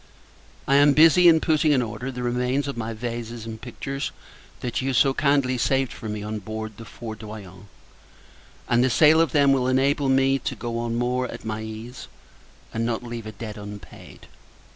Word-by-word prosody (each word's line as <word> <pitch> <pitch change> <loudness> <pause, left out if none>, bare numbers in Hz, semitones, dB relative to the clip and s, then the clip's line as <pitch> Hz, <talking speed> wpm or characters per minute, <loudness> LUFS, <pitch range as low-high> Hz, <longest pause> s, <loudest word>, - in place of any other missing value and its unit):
I 140 - +4
am 145 0 +6
busy 165 +4 +6
in 160 -1 +7
putting 155 -2 +2
in 130 -3 +2
order 120 +3 -5
the 125 -1 -6
remains 125 +3 0
of 140 - -4
my 115 -1 -4
vases 115 0 -5
and 110 -1 -8
pictures, 135 +3 -5 0.5
that 120 0 -2
you 135 +1 -1
so 135 +2 +4
kindly 140 -3 +1
saved 135 -1 +1
for 110 - -7
me 105 -1 -4
on 105 0 -4
board 110 +1 -6
the 115 - -10
Fourdroyant; 105 -4 -9 1.0
and 120 0 +3
the 130 - +3
sale 155 +5 +5
of 165 - +1
them 140 -2 +4
will 130 -2 +1
enable 135 +2 +2
me 135 +1 +3
to - - -4
go 115 -1 -4
on 115 0 -2
more 125 +1 0
at - - -9
my 110 0 -3
ease, 110 +3 -8 0.7
and 115 - -1
not 115 0 -2
leave 120 -2 -6
a - - -5
debt 110 -1 -8
unpaid. 105 0 -11
120 Hz, 185 wpm, -24 LUFS, 110-135 Hz, 1.0 s, in